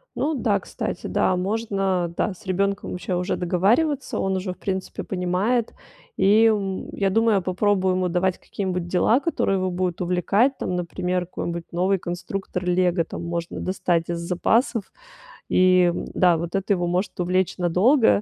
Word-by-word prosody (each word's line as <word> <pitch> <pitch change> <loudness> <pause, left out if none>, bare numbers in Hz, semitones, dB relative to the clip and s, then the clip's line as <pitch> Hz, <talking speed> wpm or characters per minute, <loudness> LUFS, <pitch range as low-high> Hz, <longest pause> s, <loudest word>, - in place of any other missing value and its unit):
Ну 310 +2 0
да, - - +1
кстати, - - -5
да, 185 - +1
можно, 195 -3 -1
да, 200 +1 -1
с 180 - -18
ребенком 195 +1 -1
вообще 180 0 -3
уже 180 +1 -1
договариваться, 235 - +1
он 190 0 0
уже, 185 0 -3
в - - -22
принципе, 190 -1 -4
понимает. 195 +6 0 0.4
И, 210 +3 +5
м, 200 -4 0
я 195 -1 +1
думаю, 225 +1 +3
я - - 0
попробую 185 +1 +1
ему 185 -1 0
давать 180 +1 0
какие-нибудь 185 -3 -4
дела, 200 +7 +3
которые 290 - 0
его 185 0 -1
будут 180 -1 -2
увлекать. 195 +9 +2
Там, 180 - -2
например, 180 +1 -2
какой-нибудь 170 -1 -5
новый 185 +3 +1
конструктор 180 +1 -5
"Лего", 180 -1 +2
там, 165 - -7
можно 170 0 -4
достать 175 -3 -1
из 170 -1 -2
запасов. 220 +6 0 0.6
И, 185 -1 +4 0.2
да, 175 -3 +4
вот 170 +1 -5
это 195 +1 +1
его 175 -2 -1
может 180 +3 -2
увлечь 180 +1 0
надолго. 180 - +3
185 Hz, 160 wpm, -23 LUFS, 180-200 Hz, 0.6 s, И